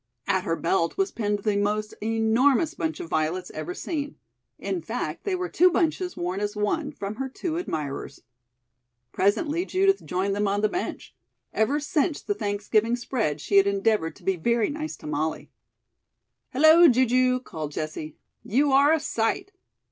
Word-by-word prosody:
At 190 Hz, -1 st, 0 dB
her 165 Hz, -, 0 dB
belt 170 Hz, 0 st, 0 dB
was 390 Hz, 0 st, +1 dB
pinned 205 Hz, -2 st, -2 dB
the 210 Hz, -2 st, +1 dB
most 210 Hz, +1 st, -1 dB
enormous 225 Hz, +8 st, +2 dB
bunch 320 Hz, 0 st, -3 dB
of 355 Hz, -, -6 dB
violets 165 Hz, -, -1 dB
ever 360 Hz, -, -5 dB
seen. 295 Hz, -6 st, -4 dB, 0.4 s
In 360 Hz, -, -3 dB
fact, -, -, -4 dB
they 395 Hz, -2 st, 0 dB
were 365 Hz, 0 st, -2 dB
two 365 Hz, +1 st, +4 dB
bunches 355 Hz, +1 st, 0 dB
worn 180 Hz, +2 st, -2 dB
as 205 Hz, +1 st, -2 dB
one, 280 Hz, +9 st, -1 dB
from 210 Hz, -7 st, -6 dB
her 270 Hz, 0 st, -3 dB
two 320 Hz, +5 st, -4 dB
admirers. 145 Hz, -, -5 dB, 0.9 s
Presently 295 Hz, -, +1 dB
Judith 390 Hz, +1 st, +2 dB
joined 195 Hz, +2 st, -1 dB
them 205 Hz, 0 st, 0 dB
on 200 Hz, +1 st, 0 dB
the 215 Hz, -, +2 dB
bench. 360 Hz, -, -5 dB, 0.4 s
Ever 255 Hz, +7 st, +1 dB
since 295 Hz, +1 st, 0 dB
the 410 Hz, -, -2 dB
Thanksgiving 215 Hz, -, 0 dB
spread 235 Hz, -, -2 dB
she 200 Hz, +6 st, +1 dB
had 195 Hz, 0 st, +6 dB
endeavored 200 Hz, -4 st, +1 dB
to -, -, -19 dB
be 190 Hz, -1 st, 0 dB
very 235 Hz, -, +1 dB
nice 310 Hz, +1 st, -5 dB
to -, -, -14 dB
Molly. 150 Hz, +1 st, -3 dB, 1.0 s
"Hello, 315 Hz, +5 st, +7 dB
Ju 255 Hz, -2 st, +4 dB
ju!" 255 Hz, +1 st, +2 dB
called 155 Hz, -, -6 dB
Jessie; 155 Hz, 0 st, -5 dB, 0.3 s
"you 275 Hz, +6 st, +2 dB
are 280 Hz, +2 st, +5 dB
a 320 Hz, -, +3 dB
sight." 285 Hz, -, -1 dB
225 Hz, 170 wpm, -25 LUFS, 200-310 Hz, 1.0 s, Hello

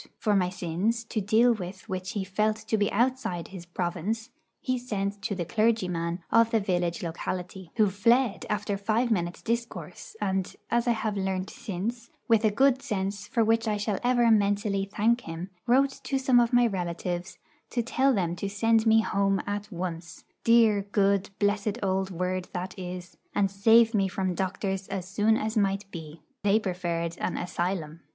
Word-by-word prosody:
For 210 Hz, -2 st, +1 dB
my 180 Hz, -2 st, +2 dB
sins, 190 Hz, +6 st, -1 dB
to 220 Hz, -1 st, -3 dB
deal 225 Hz, +5 st, +4 dB
with 190 Hz, -2 st, -7 dB
which 185 Hz, 0 st, -4 dB
he 205 Hz, -, -1 dB
felt 210 Hz, +3 st, +1 dB
to 220 Hz, 0 st, -2 dB
be 205 Hz, -1 st, +1 dB
outside 235 Hz, -7 st, 0 dB
his 180 Hz, -3 st, -9 dB
province, 185 Hz, +7 st, -3 dB, 0.3 s
he 255 Hz, -1 st, -1 dB
sent 205 Hz, -4 st, -3 dB
to 200 Hz, -, -2 dB
the 175 Hz, -2 st, -3 dB
clergyman 180 Hz, -6 st, 0 dB
of 230 Hz, 0 st, +5 dB
the 225 Hz, -, +2 dB
village 175 Hz, -4 st, -1 dB
locality, 180 Hz, +2 st, -5 dB
who 215 Hz, -2 st, +4 dB
fled 230 Hz, +3 st, +2 dB
after 205 Hz, -1 st, -1 dB
five 225 Hz, +4 st, 0 dB
minutes' 175 Hz, -4 st, -1 dB
discourse; 235 Hz, -, -4 dB
and, 190 Hz, -1 st, -1 dB, 0.2 s
as 235 Hz, +1 st, +2 dB
I 240 Hz, -, +4 dB
have 220 Hz, -2 st, -2 dB
learnt 190 Hz, -1 st, -2 dB
since, 230 Hz, +4 st, -5 dB, 0.2 s
with 225 Hz, -1 st, +4 dB
a 215 Hz, -, +5 dB
good 265 Hz, +4 st, +3 dB
sense 200 Hz, -1 st, -3 dB
for 230 Hz, -, +2 dB
which 225 Hz, +1 st, +2 dB
I 210 Hz, -1 st, +1 dB
shall 205 Hz, -1 st, -1 dB
ever 240 Hz, -1 st, +4 dB
mentally 205 Hz, -1 st, +2 dB
thank 235 Hz, +4 st, +2 dB
him, 165 Hz, 0 st, -7 dB, 0.2 s
wrote 270 Hz, +3 st, +3 dB
to 275 Hz, -, 0 dB
some 260 Hz, -2 st, +4 dB
of 235 Hz, -1 st, +2 dB
my 245 Hz, -1 st, +5 dB
relatives 175 Hz, -3 st, -3 dB, 0.3 s
to 240 Hz, -, -1 dB
tell 265 Hz, +3 st, +2 dB
them 175 Hz, -7 st, 0 dB
to 200 Hz, +3 st, -3 dB
send 225 Hz, +2 st, +2 dB
me 220 Hz, 0 st, +6 dB
'home' 195 Hz, -2 st, +1 dB
at 205 Hz, +1 st, -4 dB
once 170 Hz, -2 st, -5 dB, 0.2 s
dear, 230 Hz, -3 st, +5 dB
good, 200 Hz, -1 st, +1 dB
blessed 205 Hz, +1 st, 0 dB
old 190 Hz, 0 st, 0 dB
word 185 Hz, 0 st, -2 dB
that 185 Hz, +1 st, -4 dB
it 190 Hz, -, -8 dB
is! 180 Hz, 0 st, -7 dB, 0.2 s
and 195 Hz, -2 st, +2 dB
save 225 Hz, +3 st, +5 dB
me 195 Hz, -3 st, +2 dB
from 190 Hz, -1 st, -1 dB
doctors 190 Hz, +1 st, -2 dB
as 190 Hz, -2 st, -4 dB
soon 210 Hz, +3 st, +2 dB
as 220 Hz, +1 st, -2 dB
might 200 Hz, -1 st, +1 dB
be. 160 Hz, -2 st, -9 dB, 0.2 s
They 205 Hz, +1 st, +3 dB
preferred 175 Hz, -4 st, -3 dB
an -, -, -2 dB
'asylum.' 175 Hz, -3 st, -3 dB
200 Hz, 180 wpm, -27 LUFS, 185-225 Hz, 0.3 s, me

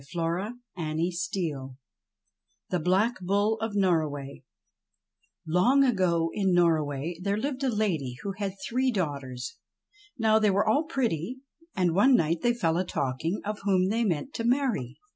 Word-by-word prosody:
Goody 175 Hz, +7 st, -1 dB, 0.3 s
me 165 Hz, +4 st, -1 dB
I 170 Hz, -6 st, -2 dB, 1.1 s
THE 180 Hz, -, +1 dB
BLACK 190 Hz, +8 st, +1 dB
BULL 205 Hz, +4 st, +1 dB
OF 225 Hz, -2 st, -2 dB
NORROWAY 155 Hz, -8 st, 0 dB, 1.0 s
LONG 185 Hz, -, +4 dB
ago 180 Hz, -9 st, +2 dB
in 190 Hz, -3 st, +1 dB
Norroway 160 Hz, -1 st, +1 dB
there 200 Hz, +2 st, 0 dB
lived 275 Hz, +3 st, -3 dB
a 265 Hz, -, +2 dB
lady 175 Hz, -, -1 dB
who 200 Hz, -, -2 dB
had 195 Hz, -1 st, -3 dB
i -, -, -25 dB
three 255 Hz, +2 st, +1 dB
daughters. 140 Hz, -, -4 dB, 0.6 s
Now 220 Hz, -2 st, +4 dB
they 215 Hz, -1 st, +3 dB
were 200 Hz, +2 st, +2 dB
all 285 Hz, +9 st, +3 dB
pretty, 255 Hz, -, -2 dB, 0.3 s
and 180 Hz, -4 st, +2 dB
one 250 Hz, +9 st, +5 dB
night 165 Hz, -4 st, +1 dB
they 240 Hz, 0 st, +2 dB
fell 165 Hz, -8 st, +1 dB
a 180 Hz, -, +1 dB
talking 160 Hz, +3 st, -2 dB
of 210 Hz, 0 st, -3 dB
whom 190 Hz, -2 st, +2 dB
they 230 Hz, +3 st, +1 dB
meant 195 Hz, -, -1 dB
to 230 Hz, -, -3 dB
marry. 240 Hz, -, 0 dB
190 Hz, 155 wpm, -27 LUFS, 165-220 Hz, 1.1 s, one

